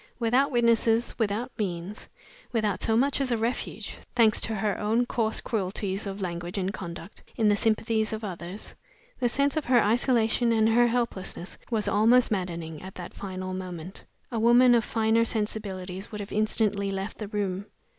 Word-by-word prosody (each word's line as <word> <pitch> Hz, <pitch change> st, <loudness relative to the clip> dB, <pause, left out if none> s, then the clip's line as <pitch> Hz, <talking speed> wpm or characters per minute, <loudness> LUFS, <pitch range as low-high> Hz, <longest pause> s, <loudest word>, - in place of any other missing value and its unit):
Without 250 Hz, +4 st, +2 dB
witnesses, 235 Hz, -2 st, +3 dB
without 220 Hz, +3 st, -1 dB
means, 185 Hz, 0 st, -4 dB, 0.4 s
without 215 Hz, -5 st, 0 dB
so 225 Hz, 0 st, +2 dB
much 275 Hz, +3 st, +2 dB
as 265 Hz, -2 st, 0 dB
a 235 Hz, -, +2 dB
refuge 230 Hz, +3 st, -3 dB, 0.2 s
thanks 225 Hz, -3 st, +4 dB
to 220 Hz, -, -1 dB
her 205 Hz, 0 st, -1 dB
own 225 Hz, +4 st, +2 dB
coarse 225 Hz, -2 st, 0 dB
cruelties 195 Hz, -1 st, -2 dB
of 195 Hz, +1 st, -5 dB
language 175 Hz, 0 st, -4 dB
and 190 Hz, +1 st, -1 dB
conduct 170 Hz, -1 st, -8 dB
in 220 Hz, -2 st, +3 dB
the 205 Hz, -, +4 dB
sympathies 220 Hz, 0 st, +1 dB
of 220 Hz, 0 st, -4 dB
others, 185 Hz, 0 st, -6 dB, 0.5 s
the 245 Hz, -2 st, +2 dB
sense 280 Hz, +4 st, +1 dB
of 310 Hz, -, -1 dB
her 245 Hz, -1 st, +5 dB
isolation 235 Hz, +1 st, +2 dB
and 220 Hz, -1 st, +3 dB
her 240 Hz, +2 st, +5 dB
helplessness 230 Hz, -7 st, -3 dB
was 220 Hz, -3 st, -1 dB
almost 230 Hz, +4 st, +4 dB
maddening 170 Hz, -5 st, -3 dB
at 190 Hz, +1 st, -9 dB
that 180 Hz, -, -8 dB
final 185 Hz, -1 st, -5 dB
moment. 185 Hz, -1 st, -7 dB, 0.3 s
A 230 Hz, -, -1 dB
woman 240 Hz, +2 st, +6 dB
of 235 Hz, -2 st, +4 dB
finer 225 Hz, +1 st, +2 dB
sensibilities 200 Hz, -4 st, -3 dB
would 210 Hz, -, -6 dB
have 200 Hz, -, -6 dB
instantly 210 Hz, -2 st, +1 dB
left 195 Hz, +2 st, -4 dB
the 210 Hz, -, -4 dB
room. 200 Hz, -1 st, -2 dB
215 Hz, 170 wpm, -27 LUFS, 190-230 Hz, 0.5 s, woman